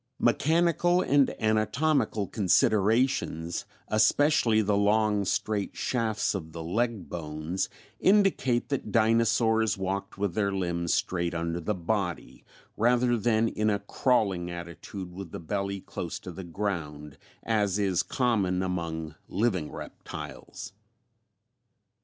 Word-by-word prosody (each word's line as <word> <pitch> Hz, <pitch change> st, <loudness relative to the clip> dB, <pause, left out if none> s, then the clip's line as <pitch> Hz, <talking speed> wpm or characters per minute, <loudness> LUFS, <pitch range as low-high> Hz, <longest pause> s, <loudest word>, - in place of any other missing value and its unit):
Mechanical 170 Hz, +7 st, +3 dB
and 140 Hz, -1 st, +4 dB
anatomical 110 Hz, +2 st, +1 dB
considerations, 100 Hz, -3 st, +1 dB, 0.2 s
especially 110 Hz, +1 st, +3 dB
the 105 Hz, 0 st, +1 dB
long 105 Hz, 0 st, +2 dB
straight 105 Hz, +1 st, -1 dB
shafts 110 Hz, -4 st, 0 dB
of 80 Hz, -5 st, -6 dB
the 85 Hz, -1 st, -6 dB
leg 110 Hz, +3 st, -1 dB
bones, 80 Hz, +2 st, -3 dB, 0.3 s
indicate 190 Hz, -, +3 dB
that 140 Hz, -3 st, -2 dB
dinosaurs 115 Hz, -1 st, +3 dB
walked 95 Hz, 0 st, -3 dB
with 100 Hz, -3 st, -1 dB
their 100 Hz, -1 st, 0 dB
limbs 85 Hz, -3 st, -1 dB
straight 85 Hz, -1 st, 0 dB
under 85 Hz, +1 st, -2 dB
the 100 Hz, +5 st, -2 dB
body, 90 Hz, 0 st, -3 dB, 0.3 s
rather 120 Hz, +2 st, +3 dB
than 115 Hz, 0 st, +2 dB
in 110 Hz, -1 st, 0 dB
a 105 Hz, -, +2 dB
crawling 100 Hz, -4 st, 0 dB
attitude 85 Hz, +2 st, -7 dB
with 95 Hz, -2 st, -8 dB
the -, -, -6 dB
belly 100 Hz, +3 st, -3 dB
close -, -, -5 dB
to 90 Hz, -, -8 dB
the 95 Hz, +2 st, -8 dB
ground, 80 Hz, -6 st, -4 dB, 0.2 s
as 105 Hz, -4 st, +1 dB
is 95 Hz, -4 st, +1 dB
common 100 Hz, -8 st, 0 dB
among 85 Hz, -4 st, -3 dB, 0.2 s
living 95 Hz, -9 st, 0 dB
reptiles. -, -, -8 dB
100 Hz, 115 wpm, -28 LUFS, 90-115 Hz, 0.3 s, and